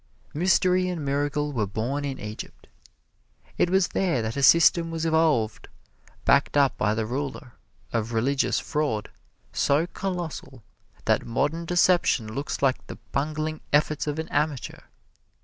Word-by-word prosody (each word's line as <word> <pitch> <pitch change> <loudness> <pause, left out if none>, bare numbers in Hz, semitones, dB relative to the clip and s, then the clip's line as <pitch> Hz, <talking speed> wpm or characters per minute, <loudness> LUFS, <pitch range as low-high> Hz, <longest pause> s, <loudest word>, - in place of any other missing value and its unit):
Mystery 185 +2 +2
and 165 -5 -4
miracle 145 +1 -1
were 110 -5 -1
born 125 +8 -2
in 135 -2 -4
Egypt. 105 +1 -8 0.9
It 175 - +3
was 190 -1 +2
there 170 -12 0
that 110 +1 -3
a 140 - -2
system 165 +3 +5
was 165 0 -3
evolved, 155 -9 +1 0.6
backed 140 +1 +3
up 140 -2 +4
by 105 0 0
the 110 0 -1
ruler, 130 +1 -5 0.4
of 115 0 -1
religious 130 +5 +1
fraud 145 -9 -2 0.4
so 145 +4 +2
colossal 175 - -5 0.4
that - - +2
modern 160 +8 -1
deception 170 -10 +2
looks 140 +2 -4
like 135 -1 +1
the - - -8
bungling 155 +2 -2
efforts 150 0 +1
of 150 0 -2
an 160 0 -3
amateur. 145 -3 -2
145 Hz, 140 wpm, -25 LUFS, 125-165 Hz, 0.9 s, system